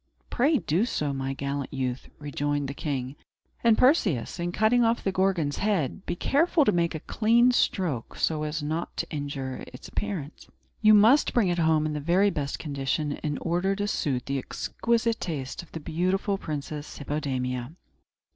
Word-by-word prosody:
"Pray 285 +5 +3
do 175 - +1
so, 150 - -1
my 135 0 -2
gallant 140 0 -3
youth," 130 -2 -3
rejoined 145 -1 -2
the 135 - -4
king. 135 -2 -3 0.5
"And, 230 -2 +5
Perseus, 200 - +2
in 175 0 -1
cutting 220 +5 +3
off 230 +1 +1
the 195 - +1
Gorgon's 185 -6 +1
head, 195 -4 0
be 175 - -1
careful 300 - +2
to - - +4
make 170 -2 +1
a 155 - -5
clean 235 +3 +3
stroke, 175 - 0
so 155 -2 0
as 150 0 -3
not 160 +3 -3
to - - -1
injure 140 -3 -4
its 125 - -11
appearance. 180 -8 -5 0.3
You 215 -1 +7
must 225 +8 +5
bring 220 -7 +3
it 175 0 0
home 160 -1 +3
in 155 - -1
the 150 - -2
very 180 +7 +3
best 140 -4 -3
condition, 145 0 -2
in 150 -2 -3
order 180 +4 0
to 205 +1 -2
suit 135 -10 -1
the 140 0 -1
exquisite 230 - -1
taste 140 -7 -4
of 175 - -17
the 165 - -5
beautiful 185 +6 0
Princess 150 -2 -5
Hippodamia." 130 -3 -3
160 Hz, 175 wpm, -27 LUFS, 140-205 Hz, 0.5 s, You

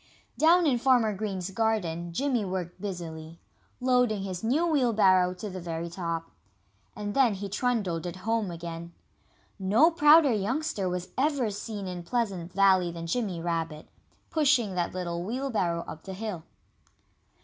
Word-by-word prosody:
Down 340 +3 +5
in 260 -5 +2
Farmer 245 -4 +3
Green's 195 -2 -4
garden 185 -6 -1
Jimmy 255 +3 0
worked 185 -2 -4
busily, 165 -4 -6 0.4
loading 250 -5 +2
his 185 -1 -5
new 275 +10 +2
wheelbarrow 210 - +3
to 195 +4 -6
the 190 -2 -6
very 170 0 -4
top. 165 -2 -4 0.6
And 205 -1 -4
then 245 -5 +3
he 200 +1 -5
trundled 195 -6 -1
it 175 - -5
home 220 +1 -1
again. 170 0 -7 0.7
No 215 - +4
prouder 300 -4 +6
youngster 215 - -1
was 180 0 -4
ever 275 -6 +1
seen 205 0 -5
in 180 -1 -5
Pleasant 190 -4 -2
Valley 190 -2 +4
than 165 0 -6
Jimmy 190 -1 -2
Rabbit, 165 -2 -3 0.4
pushing 270 -10 +2
that 175 -1 -1
little 170 -1 -3
wheelbarrow 210 -7 -1
up 160 - -8
the 190 - -8
hill. 200 -5 -5
195 Hz, 145 wpm, -28 LUFS, 175-240 Hz, 0.7 s, prouder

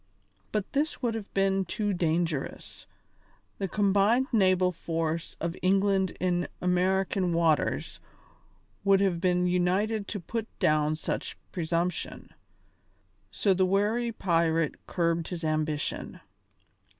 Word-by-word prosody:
But 210 -2 -2
this 290 0 -1
would 235 -2 +1
have 220 -3 -6
been 195 0 +2
too 205 +3 -2
dangerous; 165 -4 -2 0.7
the 195 - -1
combined 205 +6 +3
naval 185 -5 +3
force 165 -1 -3
of 170 +1 -2
England 195 0 +2
in 180 -1 0
American 185 0 +1
waters 165 -2 +1 0.8
would 195 -1 +5
have 185 -4 +1
been 180 -1 +2
united 190 +4 +1
to 205 - -4
put 225 +5 -4
down 155 0 +2
such 155 - -4
presumption. 170 0 -2 1.0
So 100 - +2
the 185 0 +2
wary 210 +5 +1
pirate 165 -6 0
curbed 170 -2 0
his 175 -2 -5
ambition. 155 -1 -2
180 Hz, 115 wpm, -28 LUFS, 165-200 Hz, 1.0 s, would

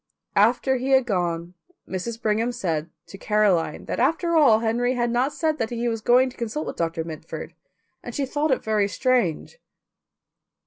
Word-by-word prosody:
After 245 +5 +3
he 255 +2 -3
had 265 -1 +5
gone 175 -4 -2 0.3
Mrs. 220 +5 -4
Brigham 225 +1 0
said 165 -9 -2 0.2
to 195 - -12
Caroline 200 -8 +1
that - - -3
after 325 +6 +1
all 285 -9 +6
Henry 240 +3 0
had 240 -1 0
not 250 +4 +1
said 315 -1 -1
that 225 - -1
he 240 0 -2
was 225 -2 -2
going 255 +3 +4
to - - -18
consult 240 +6 -3
with - - -5
Doctor 165 -1 -2
Mitford, 160 -1 -8 0.5
and - - -8
she 280 - 0
thought 295 +3 -1
it 260 - +1
very 215 -2 +1
strange. 245 - 0
235 Hz, 175 wpm, -24 LUFS, 195-260 Hz, 0.5 s, all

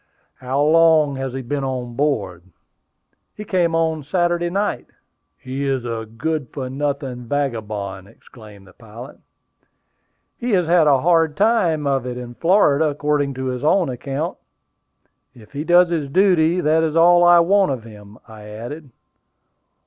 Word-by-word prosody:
"How 130 +2 -3
long 155 -2 +4
has 135 -1 -4
he 135 0 -5
been 140 +3 -3
on 125 -3 -4
board?" 110 - -2 0.9
"He 210 - -8
came 175 -4 0
on 160 -1 0
Saturday 175 +3 0
night." 200 +3 -2 0.5
"He 130 +2 -6
is 135 -3 -2
a 115 -2 -5
good 155 +1 -3
for 130 -3 -6
nothing 135 -3 -4
vagabond!" 105 -8 -4
exclaimed 105 -2 -16
the 95 - -18
pilot. 115 +4 -12 1.2
"He 245 - -3
has 180 -3 +2
had 165 -1 +3
a 135 -3 +3
hard 165 -2 +2
time 185 -9 +1
of 135 -3 -1
it 125 0 -5
in 120 -1 -8
Florida, 165 - +2
according 145 -1 -1
to 130 0 -5
his 125 0 -4
own 175 +1 +2
account. 135 +6 -5 1.0
If 110 -3 -17
he 145 +1 -5
does 175 +1 +4
his 155 -5 -2
duty, 180 0 +2
that 155 +1 +2
is 160 -1 -1
all 175 +1 +5
I 175 0 +6
want 190 +1 +3
of 125 -4 -4
him," 105 -2 -14
I 110 -2 -13
added. 120 +8 -9
145 Hz, 155 wpm, -20 LUFS, 125-165 Hz, 1.2 s, I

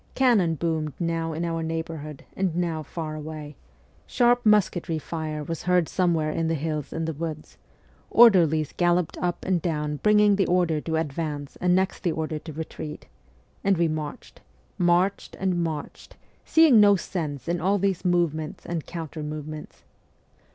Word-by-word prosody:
Cannon 215 -11 +3
boomed 155 -1 -2
now 165 -1 -1
in 165 +2 -2
our 165 -1 -2
neighbourhood 160 -2 -5
and 185 -4 -1
now 170 -3 -1
far 155 +1 -6
away: 155 -1 -7 0.5
sharp 245 0 +3
musketry 190 -6 +2
fire 155 -1 -4
was 165 +2 -5
heard 180 -2 +2
somewhere 165 -4 +1
in 165 +1 -1
the 165 - +1
hills 155 -1 -3
and 160 0 -3
the 160 - -2
woods; 155 0 -6 0.5
orderlies 170 -10 +5
galloped 175 -1 +1
up 175 -1 -2
and 185 -3 +1
down 150 -3 -2
bringing 210 +2 +4
the 195 - +2
order 175 -4 +2
to 160 +1 -2
advance 150 -2 -3
and 180 0 +3
next 190 0 0
the 175 - 0
order 155 -1 -3
to 160 - -9
retreat 155 0 -7 0.6
and 195 -2 +3
we 170 0 +3
marched, 155 -2 -6 0.4
marched, 180 +2 +1
and 185 -3 0
marched, 155 -3 -6 0.3
seeing 320 -8 +6
no 205 -1 +7
sense 155 -7 -4
in 170 -1 -1
all 195 +4 +2
these 195 -2 0
movements 170 -4 0
and 170 -3 -4
counter 165 -2 -6
movements. 150 0 -7
165 Hz, 160 wpm, -25 LUFS, 155-180 Hz, 0.6 s, no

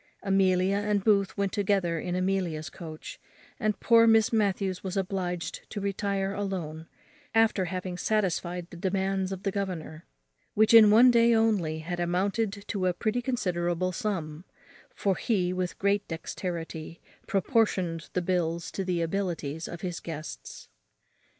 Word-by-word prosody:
Amelia 190 0 +2
and 205 -1 0
Booth 200 -3 +2
went 200 -1 0
together 190 -5 +1
in 180 +2 -3
Amelia's 185 -4 -1
coach, 160 -3 -9 0.4
and 215 -3 0
poor 230 -1 +5
Miss 225 0 +4
Matthews 195 -3 0
was 190 0 -3
obliged 180 -4 -3
to 210 - -5
retire 200 0 -1
alone, 175 -6 -4 0.5
after 225 -4 +3
having 180 0 -4
satisfied 180 -4 -1
the 175 - -9
demands 190 +1 -1
of 190 0 -6
the 195 - 0
governor, 175 -5 -4 0.5
which 220 +2 +4
in 220 -2 +9
one 235 +4 +7
day 235 0 +5
only 195 -9 +1
had 175 +2 -4
amounted 195 +4 -1
to 190 -4 0
a 180 - +2
pretty 225 +5 -1
considerable 180 -7 -1
sum; 170 -5 -3 0.5
for 195 - 0
he, 185 -6 0
with 185 -1 -3
great 200 +1 +1
dexterity, 165 -1 -5 0.3
proportioned 190 - 0
the 180 - 0
bills 170 -2 -1
to 195 - -3
the 180 -2 0
abilities 165 -4 -3
of 170 - -8
his 175 -3 -4
guests. 155 -1 -8
190 Hz, 145 wpm, -28 LUFS, 175-205 Hz, 0.5 s, in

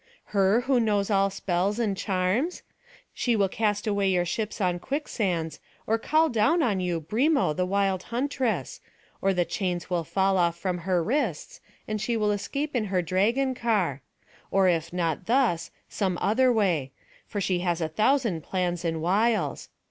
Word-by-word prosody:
her, 200 +3 +3
who 255 0 +2
knows 210 -2 +1
all 195 0 +3
spells 190 +2 -1
and 215 -5 0
charms? 195 - -1 0.5
She 240 -2 0
will 200 -2 +3
cast 210 +1 -1
away 200 -2 +1
your 180 -2 +2
ships 210 +6 -3
on 180 -3 0
quicksands, 185 - -2 0.3
or 225 +1 +1
call 310 +7 +3
down 295 +7 +2
on 205 -6 +1
you 175 -2 -1
Brimo 230 - +1
the 180 0 0
wild 195 -1 +1
huntress; 255 0 -2 0.4
or 195 - +2
the 180 -2 +1
chains 180 0 -3
will 175 -2 +1
fall 190 -1 +2
from 180 +1 -3
off - - -12
her 180 -3 +1
wrists, 225 - -2 0.3
and 215 -1 -3
she 230 +1 0
will 210 -1 +1
escape 275 +9 -3
in 230 -3 +1
her 185 -3 0
dragon 230 +10 +1
car; 205 - 0 0.5
or 195 -1 +3
if 170 -2 +1
not 170 -1 -2
thus, 230 -9 +2 0.2
some 190 -4 -1
other 250 +5 +3
way; 175 - +1 0.4
for 205 - -4
she 185 -2 0
has 175 -1 -1
a 160 - 0
thousand 215 - +1
plans 175 +1 -2
and 165 -2 -2
wiles. 215 +6 +1
195 Hz, 170 wpm, -26 LUFS, 180-230 Hz, 0.5 s, her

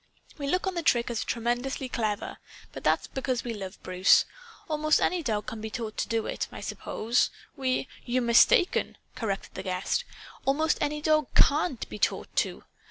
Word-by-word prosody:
We 280 - -3
look 365 +7 +1
on 380 - -1
the 340 - -1
trick 240 -6 +2
as 230 - -1
tremendously 245 +3 -1
clever. 215 -4 -2 0.3
But - - -9
that's - - +2
because 260 -2 -2
we 240 - -3
love 195 -2 -7
Bruce. 185 +1 +5 0.4
Almost 310 -1 +2
any 360 -1 +1
dog 215 -7 -1
can 225 - -6
be 220 - -4
taught 220 -1 -5
to - - -1
do 225 -1 0
it, - - -2
I - - -8
suppose. 235 +3 0 0.3
We 260 -1 0
" - - -22
"You're 250 +1 +1
mistaken!" 235 +9 +4 0.2
corrected 215 -6 -3
the - - -5
guest. 185 - -1 0.4
"Almost 300 +3 +2
any 300 0 -1
dog 310 -1 +3
CAN'T 290 -3 +3
be 210 - -8
taught - - 0
to. - - 0
245 Hz, 180 wpm, -28 LUFS, 220-300 Hz, 0.4 s, Bruce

